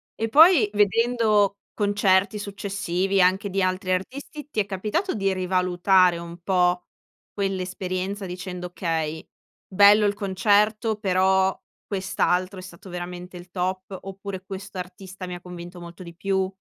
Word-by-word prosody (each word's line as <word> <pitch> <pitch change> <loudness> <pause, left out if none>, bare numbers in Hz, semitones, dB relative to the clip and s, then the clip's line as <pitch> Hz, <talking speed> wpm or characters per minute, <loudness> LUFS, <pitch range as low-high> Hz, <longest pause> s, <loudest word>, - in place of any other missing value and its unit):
E 225 0 -2
poi, 305 - +7
vedendo 210 -1 +2 0.2
concerti 205 0 +2
successivi, 195 -2 -1
anche 190 +3 +2
di 195 0 -1
altri 185 +1 -1
artisti, 275 +10 -4
ti 220 - -3
è 200 - +2
capitato 210 - -2
di 195 -2 0
rivalutare 185 0 +3
un 170 0 -8
po' 180 -1 +1 0.5
quell'esperienza 190 0 -3
dicendo: 180 0 -6
"Okay, 160 -3 -3 0.4
bello 205 +2 +6
il 200 - 0
concerto 210 +3 +2
però 190 -1 +2 0.3
quest'altro 190 -1 -1
è - - -7
stato 180 +1 -12
veramente 180 +1 -7
il 175 0 -13
top" 185 +1 -3
oppure 195 -1 -7
"Questo 195 0 -8
artista 185 +1 -8
mi 180 0 -6
convinto 175 0 -10
molto 170 +1 -11
di 170 -1 -11
più?" 190 +1 -1
190 Hz, 135 wpm, -24 LUFS, 180-200 Hz, 0.5 s, poi